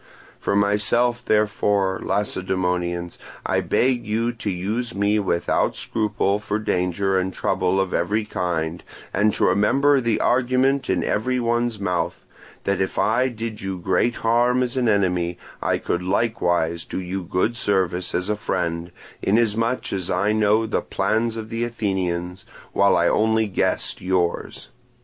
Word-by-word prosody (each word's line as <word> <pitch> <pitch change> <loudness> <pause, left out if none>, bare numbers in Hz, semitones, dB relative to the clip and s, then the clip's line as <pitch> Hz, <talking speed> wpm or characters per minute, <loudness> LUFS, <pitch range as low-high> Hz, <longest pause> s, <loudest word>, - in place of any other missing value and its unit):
For - - -1
myself, 105 +4 +2
therefore, 105 -2 +1
Lacedaemonians, 90 -3 -1 0.3
I - - +1
beg 125 -1 +1
you 115 +2 0
to 115 -3 -5
use 105 +6 -3
me 100 +2 +2
without 85 -4 0
scruple 105 -2 0
for 105 0 -2
danger 95 -1 0
and 95 +1 -1
trouble 95 +1 0
of 95 -1 -1
every 105 +5 0
kind, 85 -4 -2 0.3
and 105 +2 +3
to - - 0
remember 135 +7 +3
the 115 -2 +1
argument 130 +2 +2
in 95 - +1
every 125 +5 0
one's 120 -1 0
mouth, 90 -3 -2 0.4
that 100 0 0
if 95 - -2
I 130 - +2
did 115 -3 -5
you 95 -1 -3
great 115 +6 +1
harm 120 +2 +2
as 125 +1 -2
an 125 -3 +2
enemy, 90 -4 +1 0.2
I - - +1
could 85 - -2
likewise 90 -5 0
do - - -5
you 95 +1 -4
good 90 +7 0
service 95 -6 0
as 90 +2 -1
a 105 - 0
friend, 85 -4 -2 0.3
inasmuch 115 +3 +1
as 95 -3 -2
I 100 +4 +1
know 110 +1 +3
the 110 - -1
plans 110 +4 0
of 110 -1 -6
the 115 +1 -2
Athenians, 95 -6 -2 0.3
while - - +4
I - - +3
only 110 0 +2
guessed 95 - -1
yours. 90 -2 -1
100 Hz, 150 wpm, -23 LUFS, 90-115 Hz, 0.4 s, while